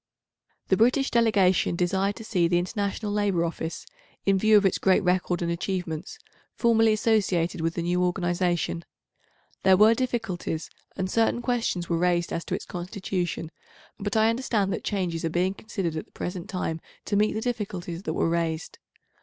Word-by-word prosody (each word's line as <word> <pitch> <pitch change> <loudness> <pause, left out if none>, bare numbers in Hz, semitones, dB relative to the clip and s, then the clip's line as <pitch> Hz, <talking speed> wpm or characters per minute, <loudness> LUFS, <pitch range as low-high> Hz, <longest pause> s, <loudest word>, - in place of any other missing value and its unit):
The 190 - +4
British 250 +5 +3
delegation 205 -7 +3
desired 190 +3 0
to 225 - -9
see 185 -6 +1
the 175 +1 +2
International 200 +3 -2
Labour 200 -5 +1
Office, 165 0 -5 0.4
in 195 -1 +3
view 215 +1 +6
of 205 - +3
its 190 - +2
great 190 +1 +3
record 180 -1 +1
and 170 - -1
achievements, 175 -1 -3 0.4
formally 225 -2 +4
associated 200 -7 +1
with 165 0 -1
the 170 - -2
new 180 +1 +1
organisation. 175 -1 0 0.8
There 190 -1 +5
were 215 +3 +7
difficulties, 225 -10 -3 0.3
and 190 -1 -1
certain 230 +4 +1
questions 230 -9 -1
were 170 -1 0
raised 175 -1 +1
as 165 - -2
to - - -2
its - - -6
constitution, 180 -2 -4 0.5
but 205 +1 -1
I 220 +1 +5
understand 225 -5 0
that - - -4
changes 180 -5 -2
are 165 - 0
being 180 +3 +1
considered 195 -6 -4
at 155 - -4
the - - -31
present 180 -1 -5
time 165 -3 -3 0.2
to 205 - -1
meet 210 +1 +3
the 220 - -2
difficulties 195 -8 -4
that 160 - -3
were - - +1
raised. 165 -1 -2
185 Hz, 170 wpm, -26 LUFS, 175-215 Hz, 0.8 s, were